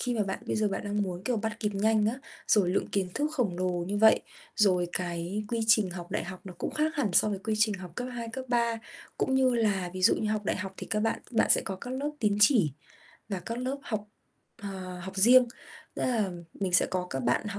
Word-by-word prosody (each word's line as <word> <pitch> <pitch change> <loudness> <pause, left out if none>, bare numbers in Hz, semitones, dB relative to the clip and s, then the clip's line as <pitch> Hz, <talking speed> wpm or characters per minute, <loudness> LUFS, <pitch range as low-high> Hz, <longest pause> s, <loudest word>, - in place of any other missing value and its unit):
khi 245 -1 -1
mà 220 - +1
bạn 195 0 -4
bây - - -1
giờ 215 -1 +2
bạn 195 - -4
đang 205 0 -1
muốn, 180 -2 -4
kiểu, 245 +1 0
bắt 220 0 -3
kịp 210 -2 0
nhanh 215 +1 +2
á, 220 - +1 0.3
rồi 195 -5 +4
lượng 185 - 0
kiến 195 -2 -1
thức 300 +1 0
khổng 235 - 0
lồ 185 0 +1 0.2
như 205 +1 -1
vậy, 220 +1 +6 0.4
rồi 180 -5 +3
cái 175 +3 -3
quy 230 0 -1
trình 215 -4 +4
học 175 -1 -8
đại - - -1
học 185 0 -8
nó 185 -2 -9
cũng - - -2
khác 310 +1 0
hẳn 235 -10 0
so 215 - +5
với 200 -2 -2
quy 215 +2 -2
trình 215 -1 +3
học 185 -3 -8
cấp 245 0 -3
2, 235 -1 -5
cấp 260 +1 -5
3, 235 -2 +1 0.4
cũng 265 - +1
như 260 -1 +3
là 200 -6 +1
ví 185 - -5
dụ 205 - +6
như 215 - -1
học 215 -1 -1
đại - - 0
học 195 0 -5
thì - - -7
các 210 - +1
bạn 225 +1 0
bạn 230 - +2
sẽ - - +6
có 190 - -4
các 240 +6 -8
lớp 275 +3 -2
tín 210 -3 +2
chỉ, 210 - +5 0.6
và 195 -3 -3
các 230 +6 -5
lớp 260 +3 -2
học, 210 -4 -4 0.5
ờ, 185 -2 -6
học 190 +2 -8
riêng, 245 +5 +7 0.5
tức - - -4
là 220 -6 +1 0.2
mình 190 -2 -3
sẽ 180 - +5
có 180 -1 -2
các 135 - -2
bạn 125 - +1
h 200 0 -5
210 Hz, 255 wpm, -29 LUFS, 185-230 Hz, 0.6 s, riêng